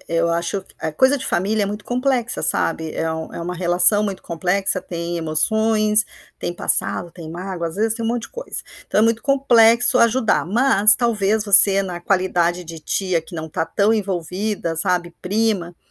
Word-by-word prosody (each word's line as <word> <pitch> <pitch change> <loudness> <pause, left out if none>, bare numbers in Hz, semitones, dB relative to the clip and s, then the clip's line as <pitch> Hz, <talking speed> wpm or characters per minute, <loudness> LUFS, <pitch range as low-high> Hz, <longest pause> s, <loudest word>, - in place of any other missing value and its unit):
eu 165 0 0
acho 170 +3 -2
q - - -22
ah, 160 - -3
coisa 260 - +2
de 265 - -7
familia 205 +3 0
é - - 0
muito 205 +1 -6
complexa, 250 -1 -1
sabe, 160 -1 -1
é 165 - -2
um 160 0 -6
é - - -7
uma 180 +2 -5
relação 180 +4 +3
muito 200 -3 -4
complexa, 185 +3 -1
tem 170 0 -5
emoções, 215 +6 +1 0.3
tem - - -4
passado, 175 0 -1
tem 165 -3 -10
mágoa, 175 -1 -5
às 165 - -10
vezes, 220 +1 0
tem 230 -1 -5
um - - -1
monte 235 0 -2
de - - -8
coisa. - - -5 0.3
Então - - 0
é - - +4
muito 230 0 0
complexo 245 -3 +4
ajudar, 235 0 +2
mas 215 0 +4
talvez, 220 -3 0
você, 195 -1 +6
na 180 -3 -5
qualidade 180 -2 0
de 165 -1 -9
tia, 175 +1 -1
que 170 +1 -11
não 160 0 -6
tá 160 - -2
tão 210 +6 +1
envolvida, 190 -2 -3
sabe, 175 +1 -1
prima, 195 -3 -1
195 Hz, 190 wpm, -20 LUFS, 170-220 Hz, 0.3 s, você